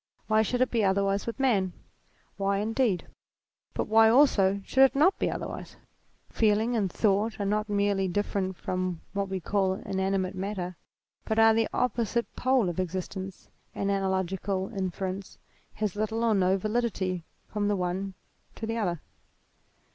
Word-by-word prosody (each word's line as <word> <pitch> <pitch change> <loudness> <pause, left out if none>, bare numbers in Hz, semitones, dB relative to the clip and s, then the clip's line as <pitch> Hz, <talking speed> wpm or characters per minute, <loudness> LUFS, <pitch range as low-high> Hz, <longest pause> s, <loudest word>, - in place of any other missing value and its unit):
Why 215 0 +3
should 245 +3 0
it 255 - +2
be 230 -3 +2
otherwise 195 +1 +1
with 230 - -4
man? 200 -9 +2 0.6
Why 195 0 0
indeed. 220 -1 0 0.7
But - - 0
why, 220 +1 +6
also, 205 -7 +4
should 265 - +2
it 270 0 +6
not 320 +8 +4
be - - +1
otherwise? - - -6 0.6
Feeling 220 +2 +2
and 200 -5 0
thought 215 +3 +1
are 200 - -1
not 210 +1 0
merely 200 -1 +1
different 190 0 -1
from 185 -2 -3
what 200 -1 -1
we 190 0 -2
call 190 +2 +1
inanimate 190 -1 -1
matter, 185 -2 -4 0.5
but 220 - -1
are 225 0 +7
at - - +3
the 225 0 +2
oppo 240 -2 0
site 235 +3 -2
pole 255 -5 +2
of 175 +1 -3
existence, 185 +1 -4 0.3
and 200 0 0
analogical 190 0 -1
inference 190 0 -4 0.4
has 210 -3 -2
little 220 +2 -1
or 230 -1 +3
no 190 -1 +3
validity 200 -4 -1 0.2
from 205 -1 -1
the 205 - +2
one 185 +1 -2 0.4
to 225 - -5
the 225 +1 -2
other. 175 -7 -1
200 Hz, 160 wpm, -28 LUFS, 190-220 Hz, 0.7 s, are